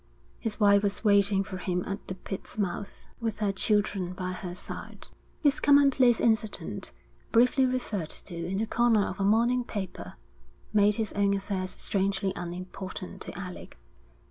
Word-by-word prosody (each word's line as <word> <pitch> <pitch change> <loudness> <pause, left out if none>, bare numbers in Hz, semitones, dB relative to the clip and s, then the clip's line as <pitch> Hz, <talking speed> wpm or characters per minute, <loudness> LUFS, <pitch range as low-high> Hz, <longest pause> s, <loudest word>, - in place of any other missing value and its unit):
His 225 -2 -3
wife 200 -1 +6
was 200 +1 -1
waiting 200 -2 +4
for 190 -1 -6
him 180 -1 -1
at 195 +1 -5
the 185 - -4
pit's 190 +2 -7
mouth, 200 0 -3
with 225 -3 -2
her 210 -2 +1
children 195 -2 0
by 185 0 -4
her 180 -1 -6
side. - - -7 0.3
This 285 -1 +4
commonplace 275 -4 +5
incident, 220 -2 0 0.4
briefly 250 +3 +4
referred 215 -10 -2
to 175 - -6
in 170 +3 -3
the 220 - +1
corner 225 -3 +3
of 190 - -6
a - - +1
morning 235 +5 +3
paper, 200 -5 -6 0.6
made 210 0 +4
his 220 -2 -2
own 200 0 +2
affairs 195 -2 -3
strangely 195 -1 0
unimportant 185 +2 -6
to - - -7
Alec. 180 -2 -8
200 Hz, 155 wpm, -28 LUFS, 185-225 Hz, 0.6 s, wife